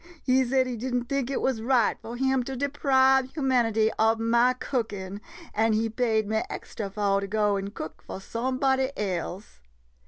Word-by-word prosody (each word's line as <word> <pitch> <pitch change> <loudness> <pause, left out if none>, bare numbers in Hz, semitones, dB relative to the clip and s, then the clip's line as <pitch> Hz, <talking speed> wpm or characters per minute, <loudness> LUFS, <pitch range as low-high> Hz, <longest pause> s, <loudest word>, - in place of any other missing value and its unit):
He 260 0 +3
said 260 +1 +2
he 250 -2 -4
did 250 +2 -3
n't 245 -1 -1
think 275 -2 -1
it 275 - -1
wuz 260 -4 0
right 240 -1 +2
fo' 230 - -8
him 265 +1 +1
to 270 - -4
deprive 265 -1 +3
humanity 235 -6 +2
ob 225 +1 +3
ma 235 +2 +3
cookin' 205 -7 -4 0.2
— - - -17
an' 220 +1 +2
he 225 +1 +1
paid 220 -3 +1
me 220 +1 0
extra 205 -3 -6
fo' 200 -1 +1
to 200 - -4
go 210 0 +1
an' 195 0 -3
cook 160 -6 -8
fo' - - -7
some 235 +6 -3
body 265 -1 +2
else. 185 - -4
235 Hz, 190 wpm, -26 LUFS, 215-260 Hz, 0.2 s, He